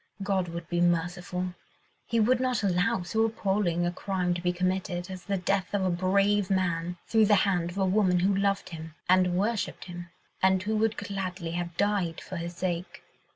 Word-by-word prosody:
God 195 Hz, -2 st, 0 dB
would 170 Hz, 0 st, -6 dB
be 175 Hz, 0 st, 0 dB
merciful. 175 Hz, +1 st, 0 dB, 0.5 s
He 230 Hz, -, +1 dB
would 240 Hz, +3 st, +3 dB
not 255 Hz, -4 st, 0 dB
allow 190 Hz, +2 st, +1 dB
so 220 Hz, +6 st, +1 dB
appalling 195 Hz, -5 st, 0 dB
a 175 Hz, -, 0 dB
crime 180 Hz, -1 st, -1 dB
to 175 Hz, -, -4 dB
be 180 Hz, 0 st, +1 dB
committed, 185 Hz, 0 st, -2 dB
as 185 Hz, -1 st, -8 dB
the 200 Hz, -1 st, 0 dB
death 190 Hz, +1 st, 0 dB
of 195 Hz, -2 st, +1 dB
a 185 Hz, -, +2 dB
brave 195 Hz, +2 st, +2 dB
man, 175 Hz, -2 st, 0 dB
through 220 Hz, -2 st, +4 dB
the 210 Hz, -, +6 dB
hand 175 Hz, -4 st, +1 dB
of 175 Hz, -, -8 dB
a 195 Hz, -, +2 dB
woman 185 Hz, -2 st, +3 dB
who 195 Hz, +2 st, +3 dB
loved 195 Hz, 0 st, 0 dB
him, 160 Hz, -2 st, -8 dB
and 180 Hz, -1 st, +4 dB
worshipped 210 Hz, +2 st, -1 dB
him, 175 Hz, -1 st, -8 dB, 0.3 s
and 190 Hz, 0 st, +3 dB
who 215 Hz, +2 st, -1 dB
would 220 Hz, 0 st, +1 dB
gladly 190 Hz, -4 st, -4 dB
have 170 Hz, 0 st, -4 dB
died 200 Hz, -5 st, +1 dB
for 185 Hz, -, -7 dB
his 170 Hz, +1 st, -5 dB
sake. 175 Hz, 0 st, -3 dB
185 Hz, 195 wpm, -28 LUFS, 175-200 Hz, 0.5 s, the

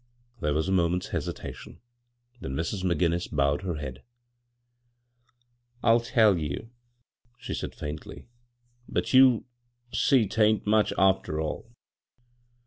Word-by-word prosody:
There 75 Hz, -2 st, 0 dB
was 80 Hz, +3 st, 0 dB
a -, -, -1 dB
moment's 90 Hz, -1 st, +1 dB
hesitation, -, -, -6 dB, 0.6 s
then 65 Hz, -10 st, -5 dB
Mrs. 85 Hz, +6 st, -2 dB
McGinnis 85 Hz, -1 st, 0 dB
bowed 70 Hz, +1 st, +1 dB
her 90 Hz, -4 st, -3 dB
head. 65 Hz, -3 st, -7 dB, 1.3 s
" 120 Hz, 0 st, -38 dB
I'll 115 Hz, +1 st, +5 dB
tell 110 Hz, -5 st, +3 dB
you," 75 Hz, +9 st, -5 dB, 0.7 s
she -, -, -6 dB
said -, -, -4 dB
faindy; 75 Hz, +1 st, -7 dB, 0.3 s
" 120 Hz, 0 st, -32 dB
but -, -, -2 dB
you'll 130 Hz, -3 st, +6 dB, 0.5 s
see 130 Hz, -6 st, +3 dB
'tain't 110 Hz, +1 st, +2 dB
much, 105 Hz, 0 st, +3 dB
after 95 Hz, -5 st, +2 dB
all. 80 Hz, +8 st, -4 dB
95 Hz, 125 wpm, -27 LUFS, 80-115 Hz, 1.3 s, you'll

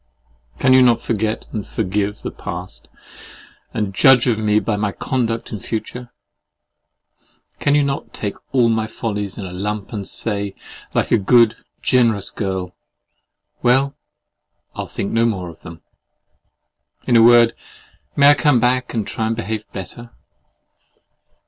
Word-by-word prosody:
Can 130 Hz, -, +4 dB
you 130 Hz, -, +7 dB
not 120 Hz, -2 st, +5 dB
forget 110 Hz, -1 st, -2 dB
and 105 Hz, -3 st, -5 dB
forgive 100 Hz, +2 st, -2 dB
the -, -, -4 dB
past, -, -, -7 dB, 0.8 s
and 105 Hz, -3 st, -2 dB
judge 125 Hz, +4 st, +5 dB
of 115 Hz, -4 st, +1 dB
me 105 Hz, -1 st, +2 dB
by 110 Hz, -1 st, -1 dB
my 105 Hz, 0 st, -1 dB
conduct 115 Hz, -1 st, -2 dB
in 105 Hz, -, -4 dB
future? 120 Hz, +4 st, -5 dB, 1.5 s
Can 145 Hz, -, +2 dB
you 145 Hz, -, +4 dB
not 140 Hz, 0 st, -3 dB
take 100 Hz, -2 st, -4 dB, 0.2 s
all 125 Hz, -3 st, +4 dB
my 110 Hz, -1 st, 0 dB
follies 105 Hz, -3 st, -4 dB
in 105 Hz, -, -5 dB
the 90 Hz, -, -7 dB
lump, 105 Hz, +3 st, -4 dB
and 100 Hz, -3 st, -5 dB
say 100 Hz, -3 st, -3 dB, 0.4 s
like -, -, 0 dB
a 115 Hz, -, +4 dB
good, 115 Hz, +2 st, +4 dB, 0.3 s
generous 115 Hz, -6 st, +2 dB
girl, 95 Hz, -3 st, -4 dB, 0.9 s
"Well, 135 Hz, +3 st, +2 dB, 0.8 s
I'll -, -, -5 dB
think 100 Hz, -, -4 dB
no 115 Hz, +1 st, +3 dB
more 95 Hz, -6 st, -3 dB
of 80 Hz, -, -14 dB
them?" 80 Hz, 0 st, -11 dB, 1.2 s
In 120 Hz, -, +2 dB
a 115 Hz, -, +7 dB
word, 120 Hz, 0 st, +6 dB, 0.6 s
may 140 Hz, 0 st, +7 dB
I -, -, +7 dB
come 145 Hz, -3 st, +3 dB
back, 125 Hz, +1 st, 0 dB
and 110 Hz, -3 st, -1 dB
try 110 Hz, -1 st, -2 dB
to 115 Hz, -, -1 dB
behave 110 Hz, -1 st, -5 dB
better? 120 Hz, +5 st, -8 dB
110 Hz, 150 wpm, -19 LUFS, 100-120 Hz, 1.5 s, you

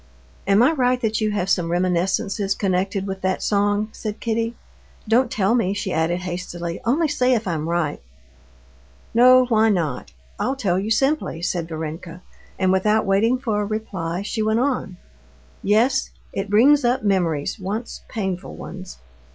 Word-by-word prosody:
"Am 200 Hz, +4 st, +5 dB
I 260 Hz, -, +5 dB
right, 255 Hz, -4 st, +1 dB
that 220 Hz, -1 st, 0 dB
you 215 Hz, -, +1 dB
have 205 Hz, -3 st, -1 dB
some 175 Hz, -4 st, +1 dB
reminiscences 185 Hz, +3 st, 0 dB
connected 190 Hz, 0 st, -1 dB
with 190 Hz, -1 st, -5 dB
that 185 Hz, 0 st, -1 dB
song?" 205 Hz, +1 st, +1 dB
said 215 Hz, -1 st, -6 dB
Kitty. 230 Hz, 0 st, -1 dB, 0.5 s
"Don't 240 Hz, +4 st, +3 dB
tell 200 Hz, +1 st, +1 dB
me," 200 Hz, -5 st, +1 dB
she 195 Hz, -2 st, -3 dB
added 165 Hz, +3 st, 0 dB
hastily, 175 Hz, -1 st, -5 dB
"only 300 Hz, +8 st, +2 dB
say 255 Hz, -3 st, +2 dB
if 225 Hz, -3 st, -2 dB
I'm 160 Hz, -2 st, -2 dB
right." 170 Hz, -4 st, -1 dB, 1.1 s
"No, 255 Hz, +2 st, +7 dB
why 225 Hz, -2 st, +3 dB
not? 155 Hz, -, -1 dB, 0.3 s
I'll 265 Hz, -, 0 dB
tell 190 Hz, -9 st, 0 dB
you 205 Hz, +3 st, -3 dB
simply," 270 Hz, -, 0 dB
said 175 Hz, -2 st, -1 dB
Varenka, 165 Hz, +2 st, -6 dB, 0.3 s
and, 185 Hz, -1 st, +2 dB
without 210 Hz, +3 st, +2 dB
waiting 210 Hz, +6 st, +2 dB
for 225 Hz, -5 st, -1 dB
a -, -, -1 dB
reply, 195 Hz, -5 st, -3 dB
she 220 Hz, +2 st, -3 dB
went 220 Hz, +1 st, +1 dB
on: 250 Hz, -8 st, -1 dB, 0.6 s
"Yes, 240 Hz, +6 st, +2 dB, 0.2 s
it 195 Hz, +1 st, -3 dB
brings 265 Hz, +8 st, +5 dB
up 245 Hz, -1 st, +1 dB
memories, 175 Hz, -6 st, 0 dB
once 205 Hz, +5 st, -5 dB
painful 190 Hz, -5 st, -4 dB
ones. 185 Hz, 0 st, -9 dB
200 Hz, 160 wpm, -22 LUFS, 180-230 Hz, 1.1 s, No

